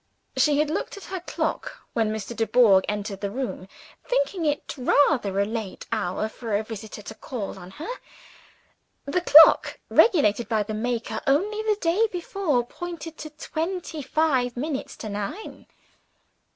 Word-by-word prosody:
She 295 Hz, -2 st, +3 dB
had 300 Hz, 0 st, +1 dB
looked 330 Hz, -, -3 dB
at 400 Hz, -, -10 dB
her 375 Hz, -, -2 dB
clock, 350 Hz, -, -4 dB
when 225 Hz, -2 st, +1 dB
Mr. 220 Hz, +2 st, -5 dB
Dubourg 225 Hz, -4 st, +4 dB
entered 205 Hz, -1 st, -4 dB
the 200 Hz, -, -1 dB
room; 235 Hz, -4 st, -4 dB, 0.4 s
thinking -, -, 0 dB
it 290 Hz, 0 st, -2 dB
rather 255 Hz, -6 st, +2 dB
a 200 Hz, -, +3 dB
late 220 Hz, -2 st, -5 dB
hour 185 Hz, +4 st, -1 dB
for 220 Hz, -1 st, -4 dB
a 210 Hz, -, 0 dB
visitor 215 Hz, -1 st, -8 dB
to 220 Hz, -, -8 dB
call 215 Hz, -4 st, -6 dB
on 180 Hz, 0 st, -10 dB
her. 320 Hz, -, -6 dB, 1.2 s
The 360 Hz, +6 st, 0 dB
clock 320 Hz, -2 st, +7 dB
(regulated 235 Hz, -, +4 dB
by 220 Hz, -2 st, +2 dB
the 215 Hz, +1 st, -5 dB
maker, 225 Hz, 0 st, -2 dB
only 405 Hz, +10 st, +2 dB
the 430 Hz, -1 st, +1 dB
day 380 Hz, +6 st, +2 dB
before) 345 Hz, -8 st, -1 dB
pointed 335 Hz, +2 st, -7 dB
to 310 Hz, -, -6 dB
twenty 320 Hz, +2 st, -4 dB
five 265 Hz, -4 st, +1 dB
minutes 280 Hz, +1 st, -4 dB
to 220 Hz, -, -6 dB
nine. 210 Hz, -, -6 dB
250 Hz, 150 wpm, -25 LUFS, 215-325 Hz, 1.2 s, clock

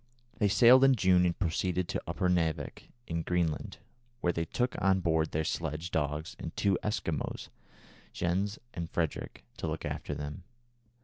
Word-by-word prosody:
They 105 Hz, -, +4 dB
sailed 120 Hz, +7 st, +7 dB
in 135 Hz, -1 st, +6 dB
June 90 Hz, -4 st, +4 dB
and 85 Hz, -, -1 dB
proceeded 90 Hz, 0 st, 0 dB
to -, -, -2 dB
Upernavik, 85 Hz, -4 st, -1 dB, 0.2 s
in 85 Hz, 0 st, -2 dB
Greenland, 85 Hz, -3 st, -1 dB, 0.4 s
where 85 Hz, -6 st, +1 dB
they 85 Hz, 0 st, -1 dB
took 125 Hz, +8 st, -1 dB
on 95 Hz, -1 st, +4 dB
board 80 Hz, -3 st, +1 dB
their 80 Hz, -, -1 dB
sledge 80 Hz, +1 st, -3 dB
dogs 75 Hz, 0 st, -2 dB
and -, -, -6 dB
two 100 Hz, -2 st, +2 dB
Eskimo, 85 Hz, -8 st, -2 dB, 0.6 s
Jens 95 Hz, +4 st, -1 dB, 0.2 s
and 85 Hz, -1 st, -4 dB
Frederick, 80 Hz, -4 st, -3 dB
to -, -, -3 dB
look -, -, -3 dB
after -, -, -4 dB
them. 75 Hz, +3 st, -5 dB
85 Hz, 150 wpm, -31 LUFS, 80-95 Hz, 0.6 s, sailed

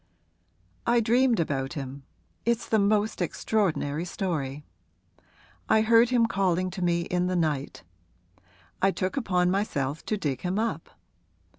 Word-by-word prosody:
'I 235 Hz, 0 st, +4 dB
dreamed 240 Hz, 0 st, +3 dB
about 135 Hz, -3 st, -1 dB
him 140 Hz, -2 st, -6 dB, 0.4 s
it's 235 Hz, 0 st, 0 dB
the 220 Hz, -, +2 dB
most 210 Hz, +1 st, +1 dB
extraordinary 165 Hz, -7 st, 0 dB
story: 150 Hz, -7 st, -3 dB, 1.1 s
I 220 Hz, 0 st, +5 dB
heard 230 Hz, +1 st, +5 dB
him 245 Hz, -2 st, +3 dB
calling 185 Hz, -4 st, 0 dB
to 185 Hz, -, -6 dB
me 170 Hz, -1 st, +1 dB
in 180 Hz, +1 st, -1 dB
the 185 Hz, -, -1 dB
night. 150 Hz, -5 st, -1 dB, 1.0 s
I 195 Hz, -, +4 dB
took 185 Hz, -1 st, -2 dB
upon 180 Hz, -9 st, +1 dB
myself 155 Hz, -8 st, -1 dB
to 215 Hz, -, 0 dB
dig 140 Hz, -9 st, -2 dB
him 180 Hz, +2 st, -2 dB
up. 225 Hz, +1 st, -2 dB
185 Hz, 135 wpm, -27 LUFS, 155-220 Hz, 1.1 s, I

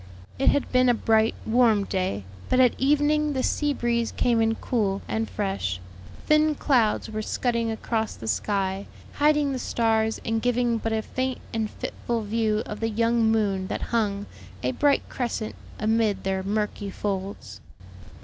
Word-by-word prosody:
It 270 Hz, -, +4 dB
had 285 Hz, -, +1 dB
been 255 Hz, 0 st, +4 dB
a 240 Hz, -, +4 dB
bright, 220 Hz, 0 st, +2 dB
warm 225 Hz, -3 st, +4 dB
day, 185 Hz, -, -2 dB, 0.3 s
but 255 Hz, -, +3 dB
at 250 Hz, -2 st, +6 dB
evening 295 Hz, +2 st, +2 dB
the 260 Hz, -1 st, -1 dB
sea 295 Hz, -1 st, +1 dB
breeze 235 Hz, -3 st, 0 dB
came 235 Hz, -2 st, +2 dB
in 225 Hz, 0 st, +2 dB
cool 200 Hz, -6 st, -1 dB
and 225 Hz, 0 st, -2 dB
fresh; 195 Hz, -, -2 dB, 0.5 s
thin 305 Hz, 0 st, +4 dB
clouds 245 Hz, -7 st, +2 dB
were 215 Hz, 0 st, -3 dB
scudding 235 Hz, +1 st, -1 dB
across 220 Hz, 0 st, -2 dB
the 110 Hz, -, -8 dB
sky, 190 Hz, -, -1 dB, 0.3 s
hiding 295 Hz, -1 st, +3 dB
the 260 Hz, -, -2 dB
stars 220 Hz, -2 st, +1 dB
and 225 Hz, 0 st, 0 dB
giving 245 Hz, -1 st, +1 dB
but 225 Hz, -, -2 dB
a 220 Hz, 0 st, 0 dB
faint 260 Hz, +2 st, -2 dB, 0.2 s
and 220 Hz, -1 st, -1 dB
fitful 230 Hz, +1 st, -4 dB
view 215 Hz, 0 st, 0 dB
of 210 Hz, -, -6 dB
the 225 Hz, -, 0 dB
young 230 Hz, 0 st, +2 dB
moon 200 Hz, -4 st, +1 dB
that -, -, -3 dB
hung, 205 Hz, -3 st, 0 dB, 0.4 s
a 125 Hz, -, +1 dB
bright 285 Hz, -, +2 dB
crescent, 235 Hz, -3 st, -3 dB, 0.2 s
amid 220 Hz, -1 st, +1 dB
their 190 Hz, 0 st, -1 dB
murky 205 Hz, +1 st, -2 dB
folds. 190 Hz, -, -4 dB
225 Hz, 160 wpm, -25 LUFS, 205-245 Hz, 0.5 s, at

